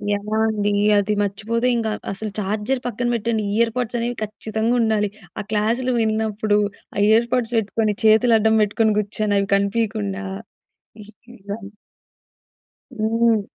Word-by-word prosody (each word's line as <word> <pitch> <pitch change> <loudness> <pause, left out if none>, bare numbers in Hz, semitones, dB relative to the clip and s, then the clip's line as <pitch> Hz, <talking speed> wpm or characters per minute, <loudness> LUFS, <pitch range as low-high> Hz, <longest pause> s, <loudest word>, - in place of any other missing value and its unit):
ఎలా 210 +2 -3
అండి? 205 -1 0 0.3
అది 205 +1 0
మర్చిపోతే 215 +4 -1
ఇంకా 225 -2 -1 0.2
అస్సలు 210 +2 -5
చార్జర్ 210 +6 -1
పక్కన 245 +1 -2
పెట్టండి, 225 -1 -1
ఇయర్‌పోడ్స్ 235 +1 0
అనేవి 240 +1 -2
ఖచ్చితంగా 220 +2 -2
ఉండాలి. 215 -2 +1 0.3
ఆ - - -1
క్లాసులు 230 +4 +1
విన్నప్పుడు, 215 -1 0 0.4
ఆ - - -5
ఇయర్‌పొడ్స్ 235 +1 +2
వెట్టుకొని 215 0 0
చేతులు 220 +2 +5
అడ్డం 220 +1 +3
పెట్టుకొని 215 +1 +1
కూర్చొని, 210 0 -1
అవి 200 - -1
కనిపీయకుండా. 200 - -1 0.8
ఇ - - -13 0.3
ఇలా 200 +2 -6 1.4
హ్మ్. 225 0 +2
220 Hz, 125 wpm, -21 LUFS, 205-230 Hz, 1.4 s, చేతులు